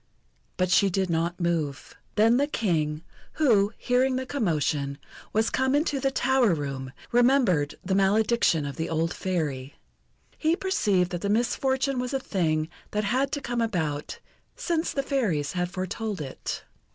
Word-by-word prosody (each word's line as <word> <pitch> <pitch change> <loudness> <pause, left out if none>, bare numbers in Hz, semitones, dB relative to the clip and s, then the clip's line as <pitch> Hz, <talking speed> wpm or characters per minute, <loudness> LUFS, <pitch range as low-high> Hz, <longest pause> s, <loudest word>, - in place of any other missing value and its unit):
But 185 -1 +1
she 195 +1 +5
did 190 -1 0
not 170 +2 -1
move. 165 -5 -2 0.2
Then 225 +3 +5
the 285 +2 +2
King, 160 - -1 0.3
who, 220 -10 +3
hearing 255 +1 +2
the 260 0 -2
commotion, 150 - -1 0.3
was 220 +1 +1
come 260 +1 +1
into 290 -2 +1
the 270 +1 +1
tower 265 -7 +2
room, 135 -3 -4 0.2
remembered 240 - +3
the 190 - 0
malediction 200 -4 +3
of 140 - -6
the 160 - -2
old 165 +1 0
Fairy. 145 -8 -3 0.6
He 320 +1 +2
perceived 205 - +1
that 175 -1 -3
the 200 - -1
misfortune 265 +4 +1
was 250 +2 -2
a - - +1
thing 155 -10 0 0.2
that 210 0 -1
had 255 +6 +1
to 285 - -1
come 240 -2 -2
about, 160 -10 -2 0.4
since 345 -9 -1
the 275 - -1
Fairies 205 - 0
had 180 -1 -1
foretold 195 +2 -4
it. 135 -3 -5
200 Hz, 155 wpm, -26 LUFS, 160-255 Hz, 0.6 s, she